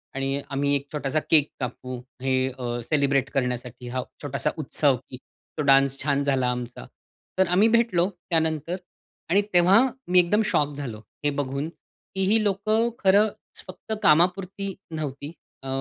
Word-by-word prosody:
आणि 135 +1 -1
आम्ही 140 +1 +1
एक 140 0 -2
छोटासा 145 0 -1
केक 150 -3 +5
कापू. 125 0 -5 0.2
हे 130 0 +1 0.2
अ, 120 -1 -3
सेलिब्रेट 140 -1 +1
करण्यासाठी 125 -1 -3
हा 130 +1 -2 0.2
छोटासा 140 -3 -1
उत्सव 145 -2 +1
की 130 - -7 0.4
तो - - 0
डान्स 135 0 +5
छान 140 -1 +1
झाला 135 -3 +1
आमचा. 125 0 -6 0.5
तर 190 - +3
आम्ही 185 +5 +4
भेटलो 220 -6 +2 0.2
त्यानंतर 160 0 0 0.5
आणि 195 +4 +4
तेव्हा 180 +4 +6 0.3
मी 180 0 +5
एकदम 180 +5 +3
शॉक 145 -5 +1
झालो. 125 -7 -6 0.3
हे - - +4
बघून 140 +2 -2
की 190 +3 -8
ही 220 -1 +4
लोकं 215 +3 +1
खरंच 200 +2 +1
फक्त 190 +4 -7
कामापुरती 190 +4 +2 0.2
नव्हती, 145 -1 -5 0.3
अ, - - -7
145 Hz, 150 wpm, -25 LUFS, 135-185 Hz, 0.5 s, तेव्हा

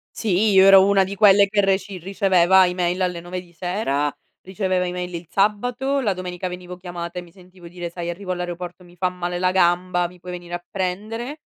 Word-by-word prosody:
Sì, 210 0 +1
io 190 0 +6
ero 195 -1 +8
una 195 -1 +4
di 195 +2 -5
quelle 200 -1 +6
che 205 0 +2
reci 195 0 0
riceveva 190 0 +3
email 180 0 -1
alle 180 -2 -1
9 180 +1 -6
di 175 -1 -19
sera, 165 -6 -1 0.3
riceveva 185 -1 -1
email 180 0 -4
il 170 0 -6
sabato, 245 +7 0
la 210 -6 +1
domenica 180 0 -5
venivo 180 0 -8
chiamata 175 -1 -7
e - - -5
mi 170 -1 -17
sentivo 180 -2 -16
dire: 175 0 -6
"Sai 170 0 -5
arrivo 185 +2 -7
all'aeroporto 180 0 -6
mi 175 0 -18
fa 185 0 0
male 175 -1 -4
la 185 0 +1
gamba, 180 -1 +2
mi 180 0 -16
puoi 180 0 -8
venire 175 -1 -9
a 175 0 -4
prendere?" 215 +10 -4
180 Hz, 205 wpm, -22 LUFS, 175-195 Hz, 0.3 s, ero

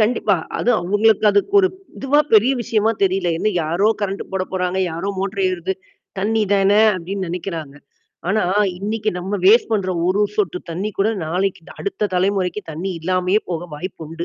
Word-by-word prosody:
கண்டிப்பா. 215 -3 +2 0.2
அதுவும் 245 -2 +2
அவங்களுக்கு 205 +4 +2
அதுக்கு 205 - +1
ஒரு 375 - +3 0.3
இதுவா 275 +2 +2
பெரிய 225 +5 +6
விஷயமா 220 0 +1
தெரியல. 190 -2 +2
ஏன்ன 215 - +1
யாரோ 170 +7 +1
கரண்ட் 200 -1 -2
போட 190 -1 0
போறாங்க, 185 0 -1
யாரோ 170 +4 -4
மோட்டர் 195 0 -2
ஏறுது 185 +1 -2 0.5
தண்ணி 220 +3 +1
தான, 195 0 +3 0.3
அப்டின்னு 190 +2 -4
நெனைக்கிறாங்க. 165 -5 -5 0.5
ஆனா 215 +3 +2 0.4
இன்னைக்கு 215 +2 -2
நம்ம 190 +3 -3
வேஸ்ட் 225 +3 +5
பண்ற 200 -4 0 0.2
ஒரு 190 +3 +2 0.2
சொட்டு 185 -4 0
தண்ணி 190 +6 -3
கூட 200 +2 +3 0.2
நாளைக்கு 185 +2 -1 0.2
அடுத்த 200 +1 -2
தலைமுறைக்கு 190 +1 0
தண்ணீ 175 +5 -4
இல்லாமயே 185 +4 +1
போக 170 0 -3
வாய்ப்பு 175 0 -7
உண்டு. 165 +1 -5
195 Hz, 160 wpm, -20 LUFS, 180-210 Hz, 0.5 s, பெரிய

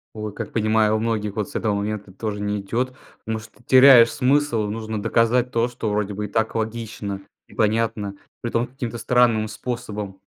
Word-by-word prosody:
Ой, 105 -1 -5
как - - -6
понимаю! 110 -1 +2
У - - 0
многих 110 -3 -1
вот 105 -2 -2
с - - -14
этого 105 -2 0
момента 100 -1 -3
тоже 105 +1 -4
не 105 0 -1
идет, 125 +6 -2 0.3
потому 110 0 -3
что 110 +3 -16
теряешь 130 -3 +8
смысл. 135 -3 +2
Нужно 110 0 -4
доказать 120 +4 +2
то, 115 +1 +2
что 120 -3 -4
вроде 105 -1 -1
бы 105 +1 -3
и - - -5
так 110 +2 -1
логично 110 -3 -4 0.3
и - - -17
понятно. 110 -2 0 0.3
Притом 120 0 0
каким-то 120 -2 -5
странным 115 -3 +3
способом. 105 -4 -5
110 Hz, 180 wpm, -23 LUFS, 105-120 Hz, 0.3 s, теряешь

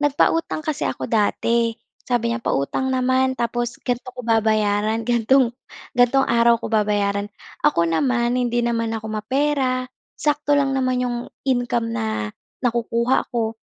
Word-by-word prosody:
nagpautang 300 +3 +1
kasi 305 -1 -2
ako - - -4
dati, 230 +1 +1 0.3
sabi 235 -2 +1
niya, 240 - -3
pautang 230 - -1
naman 260 0 +1
tapos 240 0 -2
ganto 245 0 -2
ko 250 - -7
babayaran. 215 -1 +1
Gantong 240 +1 +3 0.4
gantong 245 +2 +4
araw 235 0 +4
ko 225 - -6
babayaran. 205 -1 +1 0.4
Ako 285 -13 +4
naman, 240 - +1
hindi 240 -1 0
naman 230 -1 -1
ako 220 0 -6
mapera, 255 +3 0 0.3
sakto 290 -1 +1
lang 275 -1 +2
naman 255 -1 0
yung 245 -1 -2 0.3
income 245 - 0
na 110 -2 -2 0.3
nakukuha 235 +1 +1
ko. 225 -2 -2
235 Hz, 135 wpm, -22 LUFS, 220-260 Hz, 0.4 s, gantong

